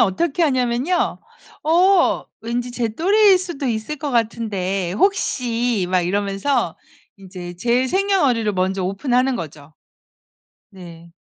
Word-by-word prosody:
어떻게 285 - +1
하냐면요. 260 +4 0 0.4
"어 355 +3 +3 0.2
왠지 240 +2 -3
제 240 -2 -1
또래일 385 - +4
수도 345 -7 -5
있을 225 +4 -2
것 290 0 -4
같은데 205 -6 -1
혹시." 240 - 0
막 185 0 +2
이러면서 200 +8 -1 0.4
인제 180 -2 -9
제 240 +6 +1
생년월일을 285 - +1
먼저 190 +1 -1
오픈하는 250 +6 0
거죠. 155 -4 -9 1.0
네. 170 -3 -13
235 Hz, 245 characters per minute, -20 LUFS, 195-290 Hz, 1.0 s, 또래일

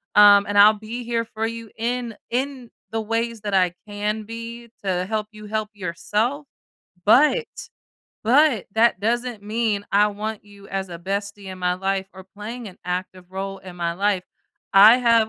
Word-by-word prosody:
um, 205 -1 +8
and 205 - -1
I'll 210 +1 +9
be 220 +3 -7
here 230 -1 0
for 220 0 -3
you 230 -1 -7
in 235 0 -2
in 255 -1 -3 0.2
the 225 - -1
ways 230 +1 -2
that 205 -1 -4
I 180 -2 +3
can 210 +1 -2
be 230 +2 -8
to 185 -2 0
help 215 +1 -2
you 215 -1 -11
help 215 0 -2
yourself, 210 - -2 0.6
but, 300 - +5 0.8
but 255 - +4
that 230 -2 +4
doesn't 235 0 -1
mean 210 -1 -1
I 205 +1 +5
want 210 +1 -5
you 200 -1 -15
as 195 -1 -3
a 170 -1 -7
bestie 200 +2 -4
in 185 - -10
my 180 0 +1
life 195 +1 -1
or 190 0 -11
playing 220 +4 -8
an 185 - -15
active 180 0 -4
role 195 +1 -5
in 185 -2 -11
my 170 -1 -1
life. 195 +1 0 0.5
I 215 +5 +9
have 230 -3 +4
210 Hz, 175 wpm, -23 LUFS, 195-230 Hz, 0.8 s, I'll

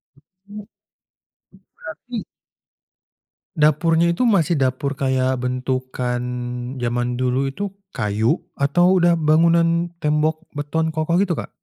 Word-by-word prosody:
Itu, 140 - -25 0.3
itu 205 0 -9 1.2
berarti 240 -4 -7 1.3
dapurnya 165 +2 +3
itu 240 +9 +1
masih 175 -7 +2
dapur 135 +2 0
kayak 130 -1 0
bentukan 125 -1 -2 0.6
zaman 120 0 -1
dulu 130 +2 0
itu 200 +8 -5 0.2
kayu 110 - +1 0.2
atau 175 +6 +3
udah 170 0 +4
bangunan 165 +2 +3 0.2
tembok 155 +2 +1
beton 160 +2 -1
kokoh 155 +2 0
gitu, 190 -2 +2
Kak? - - -5
150 Hz, 110 wpm, -21 LUFS, 130-170 Hz, 1.3 s, udah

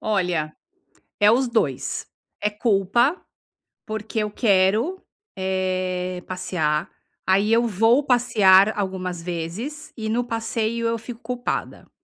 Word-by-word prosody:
Olha, 180 -7 0 0.7
é 210 0 +6
os 255 +2 +2
2, 160 - -1 0.3
é 210 - +2
culpa, 220 - +2 0.7
porque 220 0 -4
eu 210 -1 0
quero, 215 - +2 0.4
eh, 185 -1 -2
passear, 175 -4 -1 0.4
aí, 200 +3 +3
eu 235 +1 +3
vou 225 +7 +3
passear 215 -5 +5
algumas 185 -3 -3
vezes 180 - -5
e 220 -1 -3
no 240 +2 +1
passeio 230 0 -2
eu 230 - 0
fico 230 +1 -9
culpada. 250 -1 -4
210 Hz, 115 wpm, -23 LUFS, 185-230 Hz, 0.7 s, é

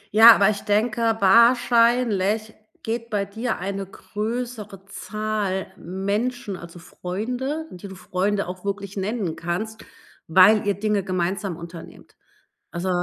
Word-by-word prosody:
Ja, 225 +1 +10
aber 200 +1 +4
ich 205 - -5
denke, 225 +2 +1
wahrscheinlich 230 -1 +4 0.3
geht 230 +1 -3
bei 205 -2 -1
dir 220 +4 -3
eine 195 +1 -4
größere 210 -1 -5
Zahl 205 -1 -3
Menschen, 200 +5 -3
also 170 -1 -11
Freunde, 245 - -4
die 180 +2 -9
du 190 - -10
Freunde 195 +2 -1
auch 180 0 -7
wirklich 200 -1 -4
nennen 195 -4 -2
kannst, 215 +6 -4 0.4
weil 190 +5 +6
ihr 200 - +2
Dinge 210 -1 0
gemeinsam 185 0 -2
unternimmt. 170 -1 -11 0.6
Also, 175 +2 -3
205 Hz, 125 wpm, -23 LUFS, 190-225 Hz, 0.6 s, Ja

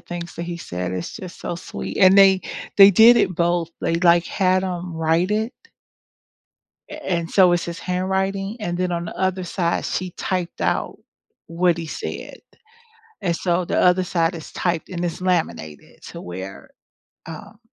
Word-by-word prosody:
things 175 -1 -7
that 170 - -4
he 170 0 -5
said, 90 - -5
it's 90 -1 -5
just 180 -2 -10
so 175 - -4
sweet 175 - -7
and 190 0 +6
they 195 -1 +6 0.4
they 200 0 +10
did 225 +5 +7
it 185 - +1
both. 170 0 0
They, 165 - +1
like, 170 0 +4
had 185 -1 +1
him 180 -1 -4
write 165 +3 +1
it 220 +3 -1 1.4
a 305 0 -9
and 170 -1 -1
so 185 -3 +5
it's 175 -1 +1
his 170 0 -6
handwriting, 190 +3 -2
and 175 -4 -3
then 180 -1 -1
on 170 0 -3
the - - -8
other 185 -1 -1
side 170 -1 -1
she 185 0 -3
typed 180 -1 -3
out - - -1 0.5
what 170 +1 +1
he 165 - -5
said, 150 - -6 0.8
and 170 -3 0
so 175 +1 0
the - - 0
other 180 +1 +4
side 170 -1 0
is 160 - -9
typed 170 -3 -2
and 175 -1 -4
it's 175 +1 -4
laminated 160 - -3
to - - -9
where, 95 -3 -8 0.6
um, 200 +6 -10
175 Hz, 175 wpm, -22 LUFS, 170-185 Hz, 1.4 s, they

